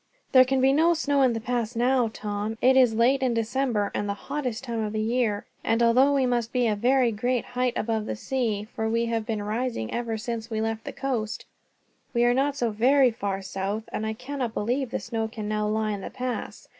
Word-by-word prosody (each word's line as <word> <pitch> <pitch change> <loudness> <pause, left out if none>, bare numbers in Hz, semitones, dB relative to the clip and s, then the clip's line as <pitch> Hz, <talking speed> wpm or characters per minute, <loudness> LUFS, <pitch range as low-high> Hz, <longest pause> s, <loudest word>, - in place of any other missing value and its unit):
"There 255 -2 +7
can 265 0 +1
be 265 +1 +4
no 330 +4 +4
snow 285 -3 +1
in 255 -3 +4
the 225 - -2
pass 240 0 -2
now, 245 +1 +2
Tom; 210 +1 -4
it 260 +1 +4
is 250 -4 +5
late 255 +4 +3
in 250 -3 +1
December, 230 -2 0
and 205 - -2
the 200 - -1
hottest 255 0 -4
time 235 -3 -3
of 210 0 -3
the 215 - -1
year; 220 -2 0 0.2
and 225 +1 +2
although 255 +4 +5
we 275 -2 +2
must 240 -2 0
be 250 -2 +1
a 215 -2 +2
very 245 +3 +3
great 245 +3 -1
height 250 0 -1
above 220 -1 -1
the - - -2
sea, 220 -4 -2
for 220 0 -1
we 230 +1 +1
have 230 -2 -2
been 215 -2 -2
rising 215 - -2
ever 235 -2 -2
since 230 +1 -5
we 220 -1 -2
left 225 0 -2
the - - -4
coast, 235 -5 -3 0.7
we 235 - +3
are 240 0 +4
not 275 +2 +1
so 240 -5 0
very 255 +4 +4
far 195 -3 -3
south, 195 +3 -3
and 220 - -2
I 220 - -1
cannot 255 0 -4
believe 245 +5 -1
the - - -2
snow 225 -1 -3
can 220 -1 -6
now 210 0 -1
lie 215 0 0
in 200 -1 -4
the - - -6
pass. 255 -1 -5
235 Hz, 230 wpm, -26 LUFS, 220-255 Hz, 0.7 s, There